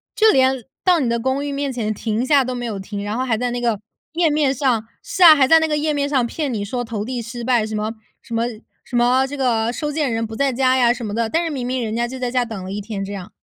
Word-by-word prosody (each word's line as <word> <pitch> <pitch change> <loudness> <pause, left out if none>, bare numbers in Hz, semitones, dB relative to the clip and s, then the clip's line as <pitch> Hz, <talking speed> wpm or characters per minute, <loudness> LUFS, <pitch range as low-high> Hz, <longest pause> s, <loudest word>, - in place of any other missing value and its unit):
就 440 0 +5
连 260 -1 +2 0.2
到 360 -3 +4
你 255 - 0
的 235 0 0
公 265 +3 -1
寓 285 - -3
面 280 -1 -2
前 220 -4 -2
停 220 +3 -2
下 280 0 +4
都 255 0 -4
没 245 0 -4
有 215 -4 -4
停， 200 +1 -6
然 205 +1 -3
后 255 - -1
还 230 -4 0
在 245 +1 -1
那 245 0 -3
个 230 -4 0 0.3
页 330 -2 +2
面 295 -2 +2
上 255 -5 +1 0.2
是 375 - -5
啊， 325 -3 +10
还 265 -3 +4
在 325 +2 +7
那 320 - +1
个 300 -1 0
页 305 +1 0
面 285 -1 -1
上 265 -4 +2
骗 285 +3 -3
你 210 -4 -2
说 245 +4 -3
投 220 -3 -4
递 245 0 -3
失 235 +1 -7
败。 235 -3 +2
什 215 - -4
么 215 +1 -2 0.3
什 230 - -9
么 230 +1 +1 0.4
什 245 - -8
么 250 +2 +3
这 285 +1 -6
个 235 -3 +1
收 295 +4 -3
件 290 -4 -1
人 225 0 -1
不 220 0 -7
在 275 +1 +1
家 260 +1 +2
呀 245 -2 +4
什 240 -1 -3
么 205 - -4
的， 230 0 0
但 330 +6 +1
是 330 - -2
明 255 -4 -3
明 255 -1 -1
人 220 0 -3
家 240 0 0
就 260 - -7
在 250 -1 -2
家 250 -1 +2
等 220 -5 -6
了 185 - -6
1 205 +1 -4
天， 200 -2 -5
这 200 - -6
样。 190 -2 -7
245 Hz, 320 characters per minute, -20 LUFS, 225-275 Hz, 0.4 s, 啊